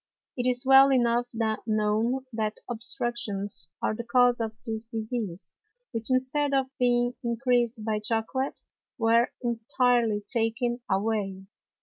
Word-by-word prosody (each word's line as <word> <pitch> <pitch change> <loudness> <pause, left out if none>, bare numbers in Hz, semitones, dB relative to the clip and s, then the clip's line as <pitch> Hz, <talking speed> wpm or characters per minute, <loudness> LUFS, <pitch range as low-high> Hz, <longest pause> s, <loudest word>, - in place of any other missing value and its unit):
It 250 0 0
is 250 +1 -1
well 270 +1 +8
enough 240 -1 +2
known 220 +2 0
that 215 -1 -2
Obstructions 230 -6 -3 0.2
are - - +1
the 235 - -5
Cause 245 0 +4
of 225 -1 -1
this 220 0 -4
Disease, 220 -4 -4 0.4
which 230 0 -2
instead 270 +3 +1
of 265 0 -1
being 245 0 +2
encreas'd 235 -1 0
by 215 -1 0
Chocolate, 225 +5 -1 0.4
were 230 0 +3
entirely 235 -2 +1
taken 240 +2 0
away. 195 -1 -1
235 Hz, 120 wpm, -27 LUFS, 220-250 Hz, 0.4 s, well